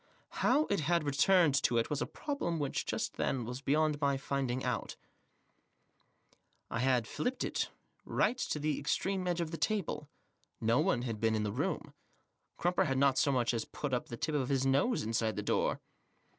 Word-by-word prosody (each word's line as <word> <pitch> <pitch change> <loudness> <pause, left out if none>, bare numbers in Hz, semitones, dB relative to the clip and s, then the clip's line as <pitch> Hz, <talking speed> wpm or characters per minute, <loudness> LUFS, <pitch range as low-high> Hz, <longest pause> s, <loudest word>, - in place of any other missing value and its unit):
How 305 +2 +4
it 200 - +2
had 170 +2 +1
returned 150 +3 +4
to 120 - +2
it 115 - 0
was 145 - -1
a - - -1
problem 280 - -3
which, 145 -3 -2
just - - -2
then, 125 -3 0
was 125 +3 -5
beyond 150 +1 +1
my 140 -1 +2
finding 135 -2 -2
out. 125 -3 -2 1.8
I - - -1
had 125 -2 +2
filliped 250 +1 -2
it - - -1 0.3
tight 255 - +1
to - - -1
the 150 -1 -1
extreme 185 +5 -1
edge 175 -1 0
of 160 -2 -3
the 165 - -4
table. 165 -9 -1 0.5
No 115 +3 +2
one 150 -7 +2
had 115 -4 -3
been 110 0 +2
in 110 - 0
the 105 - -1
mom; - - -2 0.6
Crumper 175 +1 +2
had 135 - 0
not 135 -1 +4
so 140 - +3
much 125 -2 +1
as 115 -1 -1
put 145 -3 -5
Up 125 - -1
the 120 - -6
tip 155 - -2
of 135 -4 0
his 135 -1 +1
nose 140 - +2
inside 110 0 0
the - - -3
door. - - +1
140 Hz, 190 wpm, -33 LUFS, 125-165 Hz, 1.8 s, How